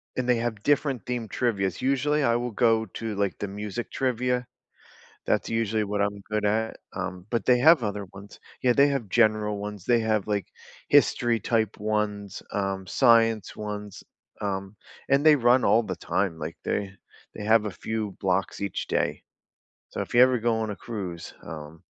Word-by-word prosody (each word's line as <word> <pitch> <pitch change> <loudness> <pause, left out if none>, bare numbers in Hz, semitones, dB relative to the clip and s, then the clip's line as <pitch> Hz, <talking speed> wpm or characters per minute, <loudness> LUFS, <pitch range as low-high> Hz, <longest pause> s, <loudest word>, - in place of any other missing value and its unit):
and 130 -1 -2
they 125 -1 +3
have 115 -3 -3
different 145 -4 +1
themed 120 -3 -3
trivias. 100 -6 -1
Usually, 140 +3 +1
I 115 -1 +3
will 120 0 -2
go 110 0 +2
to, 110 +3 -5
like, 100 -1 -1
the 100 - -4
music 105 +3 -5
trivia. 125 -1 0 0.8
That's - - 0
usually 110 -1 0
what 100 0 -2
I'm 100 0 -1
good 105 -1 0
at, 110 +2 0 0.2
um, 95 -1 -5
but 115 - -1
they 125 -1 +5
have 155 -1 +6
other 105 -1 -3
ones. 100 +1 -12 0.2
Yeah, 125 - +4
they 140 +2 +5
have 135 -8 -2
general 110 -2 +2
ones, 105 -2 -6
they 120 -1 +4
have, 110 -3 0
like, 105 -2 -1 0.4
history 120 -2 +3
type 110 -3 0
ones, 105 -1 -2
um, 95 -1 -2
science 115 -1 +3
ones, 105 -1 -6 0.4
um, 100 0 -3 0.3
and 140 +3 +3
they 155 -1 +8
run 125 0 +4
all 115 - +4
the - - -4
time, 95 -4 -1
like, 80 +2 -6
they 100 -2 -2 0.4
they 105 - -7
have 110 0 +4
a 105 - -2
few 110 +2 -4
blocks 95 0 0
each 100 -2 -3
day. - - -1 0.7
So, - - -4
if - - -5
you 120 - +7
ever 130 -1 +3
go 115 0 +1
on 110 -1 -2
a 100 - -5
cruise, 95 -8 -6
um, 80 0 -9
110 Hz, 180 wpm, -26 LUFS, 100-120 Hz, 0.8 s, they